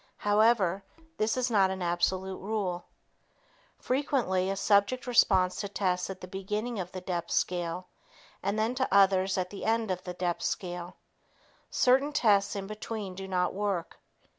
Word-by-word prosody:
However, 205 Hz, -3 st, +3 dB, 0.4 s
this 220 Hz, +3 st, +1 dB
is 250 Hz, -1 st, 0 dB
not 195 Hz, -3 st, +4 dB
an 190 Hz, -1 st, -3 dB
absolute 185 Hz, +2 st, 0 dB
rule. 190 Hz, -4 st, -3 dB, 0.9 s
Frequently, 250 Hz, -9 st, 0 dB
a 195 Hz, -, -1 dB
subject 205 Hz, +5 st, +2 dB
responds 190 Hz, -7 st, +3 dB
to 200 Hz, -, -3 dB
tests 185 Hz, -3 st, -1 dB
at 190 Hz, -1 st, -7 dB
the 185 Hz, -, -7 dB
beginning 210 Hz, +5 st, -3 dB
of 180 Hz, -1 st, -5 dB
the 185 Hz, -, -6 dB
depth 180 Hz, -2 st, -3 dB
scale 175 Hz, 0 st, -1 dB, 0.6 s
and 200 Hz, +2 st, -1 dB
then 220 Hz, +3 st, +1 dB
to 260 Hz, 0 st, -1 dB
others 195 Hz, -1 st, +4 dB
at 180 Hz, -1 st, -2 dB
the 200 Hz, -, -7 dB
end 225 Hz, -2 st, +1 dB
of 185 Hz, 0 st, -3 dB
the 180 Hz, -1 st, -6 dB
depth 175 Hz, -1 st, -2 dB
scale. 175 Hz, -1 st, -4 dB, 0.7 s
Certain 270 Hz, +3 st, +3 dB
tests 210 Hz, -10 st, +3 dB
in 195 Hz, -1 st, -4 dB
between 215 Hz, -1 st, -5 dB
do 190 Hz, +1 st, -7 dB
not 180 Hz, -1 st, 0 dB
work. 195 Hz, -4 st, -3 dB
195 Hz, 160 wpm, -29 LUFS, 185-215 Hz, 0.9 s, not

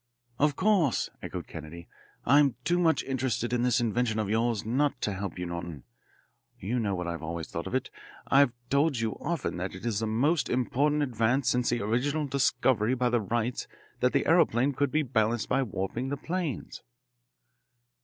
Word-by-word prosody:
"Of 145 Hz, 0 st, +3 dB
course," 185 Hz, -, +2 dB
echoed -, -, -5 dB
Kennedy. 80 Hz, +2 st, -9 dB, 0.4 s
"I'm 140 Hz, 0 st, +5 dB
too 175 Hz, +5 st, +1 dB
much 165 Hz, -2 st, +3 dB
interested 125 Hz, -3 st, -1 dB
in 120 Hz, -, +1 dB
this 125 Hz, +1 st, +2 dB
invention 115 Hz, -1 st, 0 dB
of 105 Hz, -2 st, -1 dB
yours 115 Hz, -1 st, 0 dB
not 135 Hz, +6 st, +1 dB
to 105 Hz, -, -1 dB
help 95 Hz, -2 st, -5 dB
you, 90 Hz, -, -3 dB
Norton. 85 Hz, -4 st, -6 dB, 0.7 s
You 115 Hz, +7 st, -2 dB
know 100 Hz, -4 st, 0 dB
what 90 Hz, -1 st, -3 dB
I've 85 Hz, -1 st, -4 dB
always 80 Hz, 0 st, -5 dB
thought -, -, -5 dB
of -, -, -3 dB
it -, -, -2 dB, 0.3 s
I've 140 Hz, -2 st, +4 dB, 0.2 s
told 140 Hz, 0 st, +3 dB
you 115 Hz, -1 st, 0 dB
often 170 Hz, -, -2 dB
that 90 Hz, +1 st, -4 dB
it 95 Hz, -, -9 dB
is 110 Hz, -4 st, 0 dB
the 110 Hz, -, -1 dB
most 140 Hz, +9 st, +1 dB
important 145 Hz, +4 st, +1 dB
advance 125 Hz, +1 st, +1 dB
since 125 Hz, -1 st, +1 dB
the 120 Hz, -3 st, 0 dB
original 140 Hz, +8 st, 0 dB
discovery 130 Hz, -3 st, +2 dB
by 125 Hz, -1 st, +1 dB
the 120 Hz, -2 st, +2 dB
Wrights 115 Hz, +4 st, -2 dB, 0.3 s
that -, -, +2 dB
the -, -, +1 dB
aeroplane 125 Hz, +5 st, +3 dB
could 140 Hz, +1 st, 0 dB
be 155 Hz, +3 st, +1 dB
balanced 115 Hz, -3 st, 0 dB
by -, -, +2 dB
warping 110 Hz, +2 st, -3 dB
the 140 Hz, -, -2 dB
planes." 165 Hz, -1 st, -4 dB
120 Hz, 180 wpm, -28 LUFS, 110-140 Hz, 0.7 s, I'm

